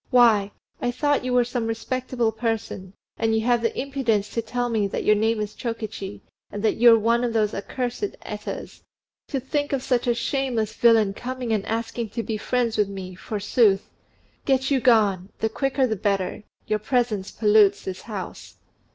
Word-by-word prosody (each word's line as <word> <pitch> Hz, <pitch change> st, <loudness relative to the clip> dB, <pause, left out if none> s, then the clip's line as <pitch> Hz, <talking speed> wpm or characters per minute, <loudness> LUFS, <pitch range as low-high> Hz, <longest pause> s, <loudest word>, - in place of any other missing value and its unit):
Why, 230 Hz, -6 st, +5 dB, 0.3 s
I 245 Hz, -, 0 dB
thought 290 Hz, +3 st, +1 dB
you 255 Hz, -, -2 dB
were 250 Hz, 0 st, +4 dB
some 240 Hz, -1 st, -3 dB
respectable 240 Hz, 0 st, -1 dB
person; 220 Hz, -4 st, -3 dB, 0.3 s
and 225 Hz, 0 st, +2 dB
you 220 Hz, -, +2 dB
have 240 Hz, +1 st, +2 dB
the 230 Hz, -, -1 dB
impudence 245 Hz, -7 st, 0 dB
to 230 Hz, -, -1 dB
tell 245 Hz, +2 st, -2 dB
me 220 Hz, -4 st, +1 dB
that -, -, -3 dB
your 210 Hz, -, +5 dB
name 220 Hz, +1 st, +1 dB
is 210 Hz, 0 st, -3 dB
Chokichi, 220 Hz, -4 st, -5 dB, 0.3 s
and 205 Hz, -, -5 dB
that 220 Hz, -, +2 dB
you're 235 Hz, -1 st, +7 dB
one 230 Hz, +2 st, +2 dB
of 240 Hz, -2 st, -1 dB
those 215 Hz, -2 st, +1 dB
accursed 250 Hz, -, -3 dB
Etas. -, -, -6 dB, 0.5 s
To 275 Hz, -, -2 dB
think 290 Hz, +3 st, -2 dB
of 265 Hz, -2 st, -1 dB
such 250 Hz, -2 st, 0 dB
a 240 Hz, -, +3 dB
shameless 240 Hz, -4 st, -1 dB
villain 225 Hz, -4 st, +4 dB
coming 250 Hz, +1 st, -4 dB
and 210 Hz, -3 st, 0 dB
asking 230 Hz, 0 st, -3 dB
to 230 Hz, -, 0 dB
be 220 Hz, -1 st, -3 dB
friends 235 Hz, +1 st, 0 dB
with 210 Hz, -2 st, +2 dB
me, 190 Hz, -2 st, -7 dB
forsooth! 205 Hz, +1 st, +1 dB, 0.5 s
Get 265 Hz, 0 st, +1 dB
you 270 Hz, -, +4 dB
gone! 205 Hz, -6 st, +3 dB
the 220 Hz, -, 0 dB
quicker, 270 Hz, +3 st, 0 dB
the 220 Hz, -3 st, -1 dB
better: 200 Hz, 0 st, -1 dB, 0.2 s
your 215 Hz, -, 0 dB
presence 215 Hz, -4 st, 0 dB
pollutes 210 Hz, -2 st, +4 dB
the 190 Hz, -, -2 dB
house." 200 Hz, 0 st, -8 dB
225 Hz, 180 wpm, -24 LUFS, 210-245 Hz, 0.5 s, you're